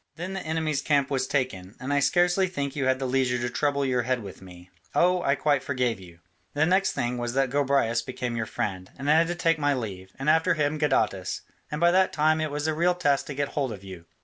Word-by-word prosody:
Then 180 Hz, +3 st, -5 dB
the 190 Hz, -, -3 dB
enemy's 155 Hz, -3 st, -1 dB
camp 145 Hz, -2 st, +1 dB
was 130 Hz, -1 st, 0 dB
taken, 110 Hz, -9 st, -2 dB
and 135 Hz, +3 st, -3 dB
I 145 Hz, -, +3 dB
scarcely 175 Hz, +5 st, +3 dB
think 140 Hz, -5 st, -4 dB
you 140 Hz, -2 st, -1 dB
had 130 Hz, 0 st, +2 dB
the 135 Hz, -, -3 dB
leisure 130 Hz, -1 st, +1 dB
to 120 Hz, 0 st, -2 dB
trouble 140 Hz, +1 st, 0 dB
your 125 Hz, -2 st, +1 dB
head 125 Hz, -1 st, -1 dB
with 95 Hz, -2 st, -10 dB
me 90 Hz, -1 st, -14 dB, 0.2 s
oh, 180 Hz, +1 st, +3 dB
I 140 Hz, -4 st, +2 dB
quite 145 Hz, +1 st, +1 dB
forgave 125 Hz, -5 st, -1 dB
you. 85 Hz, -2 st, -14 dB, 0.3 s
The 150 Hz, +2 st, +3 dB
next 190 Hz, +3 st, +2 dB
thing 120 Hz, 0 st, -2 dB
was 120 Hz, 0 st, -3 dB
that 135 Hz, -1 st, +1 dB
Gobryas 140 Hz, -5 st, +2 dB
became 125 Hz, -2 st, -4 dB
your 110 Hz, -1 st, -2 dB
friend, 95 Hz, -3 st, -4 dB
and 140 Hz, +2 st, 0 dB
I -, -, +7 dB
had 165 Hz, +1 st, +4 dB
to 175 Hz, -, -2 dB
take 165 Hz, -2 st, +1 dB
my 145 Hz, -1 st, +2 dB
leave, 95 Hz, -6 st, -6 dB
and 135 Hz, -, -5 dB
after 160 Hz, +2 st, +4 dB
him 150 Hz, 0 st, 0 dB
Gadatas, 110 Hz, -10 st, 0 dB, 0.3 s
and 150 Hz, -, -4 dB
by 170 Hz, +1 st, +5 dB
that 185 Hz, +1 st, +3 dB
time 155 Hz, +1 st, +2 dB
it 155 Hz, -, -1 dB
was 145 Hz, +1 st, -3 dB
a 160 Hz, -, +1 dB
real 175 Hz, +3 st, +2 dB
task 145 Hz, -6 st, +1 dB
to 140 Hz, -, -5 dB
get 145 Hz, 0 st, -1 dB
hold 135 Hz, -4 st, -2 dB
of 100 Hz, -3 st, -8 dB
you. 95 Hz, -3 st, -10 dB
140 Hz, 250 wpm, -26 LUFS, 120-155 Hz, 0.3 s, I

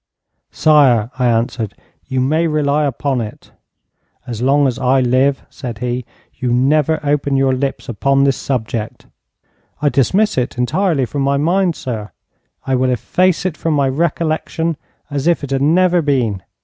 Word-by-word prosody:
'Sire,' 130 Hz, -7 st, +3 dB
I 125 Hz, -, +2 dB
answered, 115 Hz, -2 st, -1 dB, 0.3 s
'you 130 Hz, -, -1 dB
may 155 Hz, +6 st, +1 dB
rely 150 Hz, -1 st, +1 dB
upon 135 Hz, -1 st, -1 dB
it.' 105 Hz, -2 st, -9 dB, 0.7 s
'As 120 Hz, -2 st, -6 dB
long 140 Hz, +3 st, +3 dB
as 125 Hz, -2 st, -3 dB
I 130 Hz, +1 st, +3 dB
live,' 130 Hz, +2 st, +2 dB
said 120 Hz, -4 st, -7 dB
he, 125 Hz, +1 st, -3 dB, 0.3 s
'you 125 Hz, -2 st, -3 dB
never 150 Hz, +5 st, +2 dB
open 145 Hz, -1 st, 0 dB
your 135 Hz, -1 st, +2 dB
lips 135 Hz, +1 st, -3 dB
upon 135 Hz, +4 st, +1 dB
this 135 Hz, -1 st, +3 dB
subject.' 115 Hz, -4 st, -4 dB, 0.7 s
'I 145 Hz, 0 st, +2 dB
dismiss 185 Hz, -, +2 dB
it 125 Hz, 0 st, -3 dB
entirely 150 Hz, +3 st, +1 dB
from 140 Hz, +4 st, -4 dB
my 140 Hz, +1 st, +1 dB
mind, 175 Hz, +3 st, +1 dB
sire. 110 Hz, -4 st, -6 dB, 0.5 s
I 135 Hz, -, -1 dB
will 130 Hz, 0 st, +2 dB
efface 180 Hz, -, +1 dB
it 180 Hz, -4 st, -1 dB
from 165 Hz, -2 st, -1 dB
my 140 Hz, -2 st, +2 dB
recollection 160 Hz, +2 st, -1 dB, 0.4 s
as 140 Hz, +1 st, -2 dB
if 170 Hz, -3 st, +2 dB
it 140 Hz, -, -5 dB
had 135 Hz, 0 st, 0 dB
never 175 Hz, +4 st, +3 dB
been. 125 Hz, -, 0 dB
135 Hz, 160 wpm, -17 LUFS, 125-155 Hz, 0.7 s, Sire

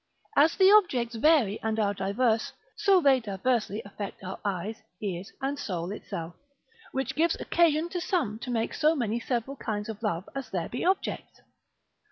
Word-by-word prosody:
As 310 Hz, +3 st, +5 dB
the 385 Hz, 0 st, +6 dB
objects 260 Hz, -, +4 dB
vary 235 Hz, -4 st, +3 dB
and 220 Hz, 0 st, -1 dB
are 205 Hz, -1 st, +2 dB
diverse, 220 Hz, +4 st, 0 dB, 0.2 s
so 390 Hz, -3 st, +4 dB
they 275 Hz, -3 st, +5 dB
diversely 215 Hz, 0 st, -1 dB
affect 200 Hz, -1 st, -7 dB
our 185 Hz, +1 st, -6 dB
eyes, 200 Hz, +2 st, -3 dB, 0.2 s
ears, 190 Hz, -2 st, -4 dB
and 280 Hz, +1 st, -1 dB
soul 180 Hz, -7 st, -3 dB
itself. 170 Hz, -5 st, -6 dB, 0.6 s
Which 265 Hz, 0 st, -2 dB
gives 330 Hz, +4 st, +2 dB
occasion 330 Hz, -1 st, +2 dB
to 355 Hz, 0 st, -3 dB
some 270 Hz, -, -1 dB
to 255 Hz, -, -7 dB
make 230 Hz, -2 st, -1 dB
so 315 Hz, +1 st, +3 dB
many 235 Hz, -4 st, -1 dB
several 245 Hz, +3 st, -2 dB
kinds 210 Hz, -2 st, -3 dB
of 220 Hz, -1 st, -6 dB
love 190 Hz, -5 st, -2 dB
as 275 Hz, -1 st, -5 dB
there 175 Hz, -3 st, -3 dB
be 245 Hz, -, -4 dB
objects. 375 Hz, +2 st, -1 dB
230 Hz, 170 wpm, -28 LUFS, 205-285 Hz, 0.6 s, the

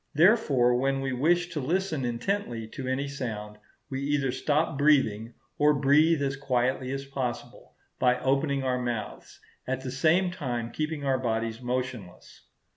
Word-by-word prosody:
Therefore, 150 Hz, -, +4 dB
when 135 Hz, +1 st, 0 dB
we 135 Hz, -1 st, -2 dB
wish 175 Hz, +7 st, +2 dB
to 165 Hz, -4 st, -4 dB
listen 160 Hz, -1 st, -1 dB
intently 120 Hz, -, -2 dB
to 130 Hz, +3 st, -6 dB
any 135 Hz, +2 st, -1 dB
sound, 110 Hz, -6 st, -6 dB, 0.3 s
we 135 Hz, -2 st, -4 dB
either 140 Hz, -2 st, 0 dB
stop 150 Hz, +3 st, 0 dB
breathing, 130 Hz, -6 st, +2 dB, 0.2 s
or 150 Hz, 0 st, +5 dB
breathe 145 Hz, +3 st, +4 dB
as 135 Hz, -1 st, -1 dB
quietly 130 Hz, -1 st, -1 dB
as 135 Hz, 0 st, -4 dB
possible, 135 Hz, -3 st, -5 dB, 0.2 s
by 125 Hz, 0 st, +3 dB
opening 135 Hz, +1 st, +1 dB
our 125 Hz, -1 st, 0 dB
mouths, 120 Hz, -3 st, -5 dB, 0.3 s
at 130 Hz, 0 st, -2 dB
the 130 Hz, -1 st, -5 dB
same 165 Hz, +7 st, +2 dB
time 120 Hz, -8 st, -4 dB
keeping 155 Hz, +1 st, -3 dB
our 135 Hz, -1 st, +1 dB
bodies 115 Hz, -1 st, -2 dB
motionless. 125 Hz, -6 st, -5 dB
135 Hz, 150 wpm, -27 LUFS, 125-145 Hz, 0.3 s, or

